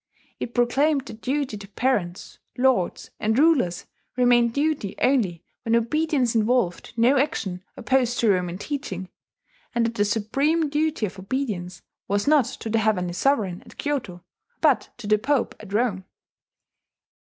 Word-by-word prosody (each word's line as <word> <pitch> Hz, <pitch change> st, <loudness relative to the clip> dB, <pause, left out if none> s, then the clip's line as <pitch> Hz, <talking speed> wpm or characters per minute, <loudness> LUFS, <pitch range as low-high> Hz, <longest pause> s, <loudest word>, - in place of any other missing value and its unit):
It 240 Hz, -, -5 dB
proclaimed 270 Hz, +4 st, +2 dB
that 225 Hz, -, -10 dB
duty 270 Hz, -4 st, -1 dB
to 200 Hz, -, -10 dB
parents, 200 Hz, -5 st, -2 dB, 0.2 s
lords, 250 Hz, -8 st, +1 dB
and 220 Hz, +2 st, +1 dB
rulers 275 Hz, -, +3 dB, 0.3 s
remained 240 Hz, -1 st, +4 dB
duty 285 Hz, -7 st, -1 dB
only 215 Hz, -, +1 dB, 0.2 s
when 230 Hz, 0 st, +1 dB
obedience 265 Hz, +1 st, +1 dB
involved 225 Hz, -5 st, 0 dB
no 250 Hz, +4 st, +4 dB
action 195 Hz, -10 st, -2 dB
opposed 250 Hz, -2 st, +1 dB
to 225 Hz, -3 st, +4 dB
Roman 180 Hz, -2 st, -1 dB
teaching, 195 Hz, -8 st, -5 dB, 0.7 s
and 235 Hz, -1 st, +2 dB
that 230 Hz, -, -1 dB
the 205 Hz, -, +1 dB
supreme 275 Hz, +10 st, +1 dB
duty 305 Hz, -5 st, 0 dB
of 195 Hz, -1 st, -7 dB
obedience 190 Hz, -6 st, -4 dB, 0.2 s
was 200 Hz, 0 st, 0 dB
not 295 Hz, -4 st, +5 dB
to -, -, -7 dB
the 225 Hz, -, +2 dB
Heavenly 190 Hz, -5 st, 0 dB
Sovereign 200 Hz, -5 st, 0 dB
at -, -, -17 dB
Kyoto, 240 Hz, -12 st, -3 dB, 0.4 s
but -, -, +2 dB
to 240 Hz, -, -10 dB
the 210 Hz, 0 st, +3 dB
Pope 270 Hz, +2 st, 0 dB
at 210 Hz, -2 st, -11 dB
Rome. 205 Hz, -4 st, 0 dB
230 Hz, 145 wpm, -24 LUFS, 200-275 Hz, 0.7 s, not